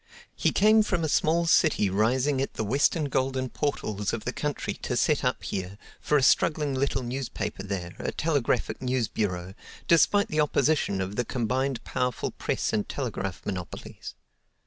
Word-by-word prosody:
He - - +1
came 215 +2 +5
from 180 -5 0
a - - +1
small 165 +3 +2
city 160 - +4
rising 125 +8 +1
at 135 - -3
the 110 - -2
eastern 150 +3 +2
golden 130 -1 -1
portals 105 -9 -2
of 115 - -4
the 120 - -2
country 150 -1 -2
to - - -2
set - - +2
up - - 0
here, 95 +1 -4 0.2
for 150 - +2
a 135 - +1
struggling 150 +1 +3
little 130 0 0
newspaper 120 -5 -4
there, 95 -3 -4
a - - -2
telegraphic 150 -6 0
news 125 -3 0
bureau, 90 -4 -3 0.3
despite 205 +5 +4
the 155 0 +2
opposition 145 -8 +1
of 95 +2 -4
the 125 - +2
combined 130 +2 -1
powerful 125 -1 -2
press - - -2
and 105 -1 -1
telegraph 100 -9 -4
monopolies. 90 -3 -6
130 Hz, 165 wpm, -27 LUFS, 105-150 Hz, 0.3 s, came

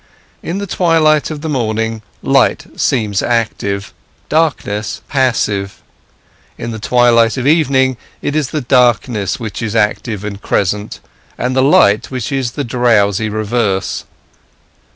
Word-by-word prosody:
In 175 - -4
the 200 - -3
twilight 165 -5 +2
of 155 -2 -6
the 160 - -4
morning, 110 -5 -1 0.2
light - - +2
seems 105 -4 0
active, 105 -4 -1 0.4
darkness 120 -9 -1
passive; 105 -7 -1 0.7
in 115 - -5
the 110 - -6
twilight 115 +1 +3
of 130 - -2
evening 135 -4 +3 0.2
it 145 - -3
is 155 -3 +1
the 155 - -2
darkness 120 -5 +2
which 110 -3 -5
is 115 -1 -3
active 105 -1 0
and 100 -1 -6
crescent, 105 +2 -1 0.4
and 125 +1 -1
the 130 - +3
light 110 -6 +4
which 130 -2 -4
is 130 -3 -1
the 145 - -3
drowsy 110 -4 +2
reverse. 105 -2 -1
115 Hz, 130 wpm, -15 LUFS, 105-135 Hz, 0.7 s, light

